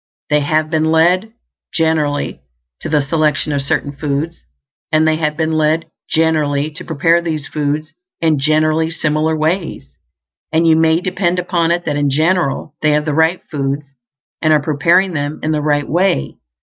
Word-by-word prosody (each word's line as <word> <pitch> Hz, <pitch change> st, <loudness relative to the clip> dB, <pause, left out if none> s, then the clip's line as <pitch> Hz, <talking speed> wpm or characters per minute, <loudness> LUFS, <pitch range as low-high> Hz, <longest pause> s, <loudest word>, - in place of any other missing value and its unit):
They 150 Hz, -, +4 dB
have 155 Hz, +2 st, 0 dB
been 160 Hz, -1 st, +1 dB
led, 175 Hz, +6 st, +2 dB, 0.4 s
generally, 155 Hz, -3 st, 0 dB, 0.4 s
to -, -, -6 dB
the 150 Hz, -2 st, +2 dB
selection 150 Hz, 0 st, 0 dB
of 140 Hz, -1 st, 0 dB
certain 140 Hz, +1 st, -1 dB
foods; 150 Hz, +3 st, -3 dB, 0.5 s
and 155 Hz, 0 st, +3 dB
they 155 Hz, 0 st, +2 dB
have 150 Hz, -1 st, -1 dB
been 160 Hz, -1 st, 0 dB
led, 155 Hz, +1 st, 0 dB, 0.2 s
generally, 155 Hz, -2 st, +1 dB
to 155 Hz, -, -8 dB
prepare 165 Hz, +2 st, +2 dB
these 155 Hz, -4 st, -3 dB
foods 150 Hz, +1 st, -3 dB, 0.3 s
in 160 Hz, -3 st, +2 dB
generally 155 Hz, +2 st, +2 dB
similar 155 Hz, -1 st, 0 dB
ways; 165 Hz, +3 st, -2 dB, 0.6 s
and 165 Hz, +1 st, +2 dB
you 160 Hz, -1 st, +5 dB
may 160 Hz, +1 st, +3 dB
depend 180 Hz, -1 st, -1 dB
upon 175 Hz, -2 st, 0 dB
it 175 Hz, +1 st, 0 dB
that 150 Hz, -2 st, -1 dB
in 145 Hz, -1 st, +1 dB
general 155 Hz, 0 st, 0 dB
they 150 Hz, -1 st, +3 dB
have 150 Hz, 0 st, +1 dB
the 155 Hz, -, -1 dB
right 160 Hz, +4 st, +2 dB
foods 140 Hz, -1 st, -2 dB, 0.6 s
and 155 Hz, -, +2 dB
are 155 Hz, -, +5 dB
preparing 170 Hz, +5 st, +2 dB
them 145 Hz, 0 st, -3 dB
in 155 Hz, -, 0 dB
the 150 Hz, -1 st, 0 dB
right 145 Hz, -1 st, 0 dB
way. 175 Hz, -, 0 dB
155 Hz, 170 wpm, -16 LUFS, 150-165 Hz, 0.6 s, you